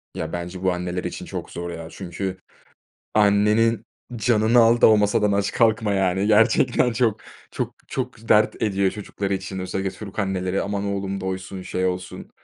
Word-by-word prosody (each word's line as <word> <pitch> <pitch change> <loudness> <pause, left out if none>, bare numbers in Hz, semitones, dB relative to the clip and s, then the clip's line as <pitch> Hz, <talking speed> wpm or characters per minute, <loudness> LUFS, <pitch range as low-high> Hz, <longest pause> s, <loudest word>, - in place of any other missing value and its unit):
Ya, 80 0 -4
bence 90 +2 -5
bu 95 - +3
anneler 90 0 -3
için - - -5
çok - - -6
zor, 85 0 -5
ya, 85 -1 -7
çünkü 95 +1 -5 0.8
annenin 105 +2 +3 0.3
canını 110 +1 +3
al 115 +1 +4
da - - +7
o 110 - +6
masadan 105 0 +2
aç 100 0 0
kalkma, 110 -3 +2
yani, 95 +1 +1
gerçekten 115 +2 +3
çok, 110 -3 +1 0.3
çok, - - -4
çok 115 +1 -5
dert 105 0 +3
ediyor 100 -3 +1
çocukları 100 -1 -4
için 95 0 -5
özellikle 95 +1 -3
Türk 100 0 -10
anneleri. 95 -1 -1
"Aman 100 0 -3
oğlum 100 -1 -3
doysun, 95 0 -5
şey 95 0 -2
olsun, 90 0 -5
100 Hz, 165 wpm, -23 LUFS, 95-105 Hz, 0.8 s, da